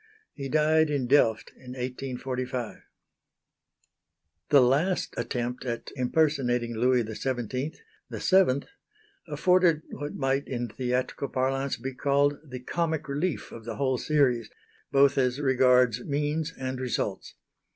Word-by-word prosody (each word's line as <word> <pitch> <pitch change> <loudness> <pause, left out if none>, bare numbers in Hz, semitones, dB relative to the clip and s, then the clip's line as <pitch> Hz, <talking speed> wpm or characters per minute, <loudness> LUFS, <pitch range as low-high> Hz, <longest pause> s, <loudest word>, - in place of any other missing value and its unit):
He 140 -1 -6
died 155 +1 +3
in 140 -4 0
Delft 120 -4 +3
in 125 -1 -10
1845. 125 -1 -4 1.7
The 145 - +7
last 145 +9 +1
attempt 120 +1 -3
at 120 -2 -4
impersonating 125 -4 +1
Louis 125 +1 +3
XVII, 125 +5 -3 0.4
the - - -6
seventh, 185 -8 +3 0.6
afforded 165 +1 +3
what 145 +2 -6
might 135 0 0
in 120 -2 -3
theatrical 125 +3 -2
parlance 135 0 -1
be 130 +3 -5
called 140 +2 +1
the 130 -4 -8
"comic 160 +2 -2
relief" 150 +4 -2
of 115 - -9
the 115 0 -5
whole 130 -3 0
series, 130 -7 +1 0.4
both 140 0 +4
as 125 +1 +1
regards 125 -3 +3
means 150 +2 -1
and 130 -1 -4
results. 105 -6 -3
130 Hz, 120 wpm, -27 LUFS, 125-145 Hz, 1.7 s, The